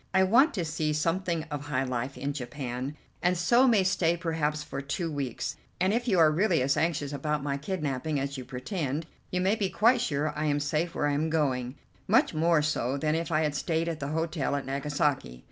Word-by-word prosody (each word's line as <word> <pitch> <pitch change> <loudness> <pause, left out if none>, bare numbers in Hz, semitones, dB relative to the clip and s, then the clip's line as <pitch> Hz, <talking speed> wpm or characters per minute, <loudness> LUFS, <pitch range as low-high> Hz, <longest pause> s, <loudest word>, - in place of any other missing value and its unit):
I 190 - +6
want 240 - +4
to 175 -4 -1
see 155 -1 -1
something 165 +2 0
of 145 0 -4
high 135 -3 0
life 130 +1 -3
in 140 +1 -2
Japan, 130 0 -5 0.3
and 180 +1 +2
so 240 +10 +4
may 220 -6 +4
stay 175 -2 +2
perhaps 155 -3 -1
for 135 -2 -5
two 160 +4 -3
weeks; 140 -5 -3 0.2
and 185 +3 +2
if 240 +2 -1
you 195 -6 +3
are 160 -2 +6
really 170 -3 +2
as 135 +1 +2
anxious 150 -3 0
about 150 +1 -1
my 140 -1 -1
kidnapping 150 -2 -2
as 140 +1 -3
you 130 - -5
pretend, 140 - -3 0.2
you 180 - -1
may 190 +2 +3
be 210 -4 0
quite 235 +5 +4
sure 150 -7 -1
I 150 +1 -1
am 145 -1 +1
safe 155 +4 -1
where - - 0
I 145 - +1
am 155 +3 0
going, 130 -5 0 0.3
much - - +4
more 160 0 +3
so 140 -3 0
than 155 +2 0
if 165 +2 -2
I 155 0 +2
had 150 -2 0
stayed 165 +2 -1
at 165 -2 -3
the 140 - -3
hotel 160 -2 -1
at 140 - -3
Nagasaki. 140 - -1
150 Hz, 215 wpm, -28 LUFS, 140-170 Hz, 0.3 s, I